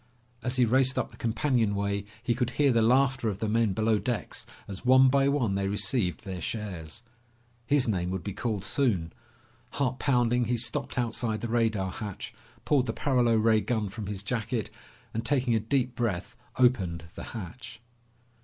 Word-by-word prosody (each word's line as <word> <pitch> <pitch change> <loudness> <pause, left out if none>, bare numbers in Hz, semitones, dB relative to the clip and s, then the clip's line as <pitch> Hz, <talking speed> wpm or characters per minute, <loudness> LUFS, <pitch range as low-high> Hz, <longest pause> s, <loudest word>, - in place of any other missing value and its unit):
As 125 +1 -1
he 125 -2 +4
raced 130 +2 +3
up - - -1
the - - -14
companionway 105 -5 0 0.2
he 120 - +1
could 125 0 -1
hear 145 -2 +4
the 115 -2 +3
laughter 130 0 +3
of 100 - -3
the 110 - -2
men 110 -1 +2
below 110 +1 +2
decks 115 -8 -4 0.2
as 95 -2 -7
one 130 +1 +6
by 135 +1 +3
one 130 -8 +1
they 100 0 0
received 100 -1 0
their 95 -2 -5
shares. 100 -2 -5 0.6
His 140 -2 +3
name 90 -5 0
would 95 -2 -3
be 100 - -4
called 110 -2 -2
soon. 100 -10 0 0.6
Heart 130 -2 -1
pounding, 120 -3 +2
he 120 +2 0
stopped 120 +2 -1
outside 115 -2 -1
the 120 - -2
radar 110 -5 +1
hatch, 105 -1 -6 0.3
pulled 135 -4 +2
the 110 - -1
paralo 125 -4 +2
ray 110 0 +4
gun 110 -4 -1
from 105 0 -6
his 100 -1 -4
jacket, 115 +1 -2 0.4
and 115 - -2
taking 130 -2 +1
a 110 - +3
deep 125 +2 0
breath 110 -7 -2 0.2
opened 95 -10 +2
the - - -8
hatch. 115 +4 -8
115 Hz, 175 wpm, -28 LUFS, 100-125 Hz, 0.6 s, one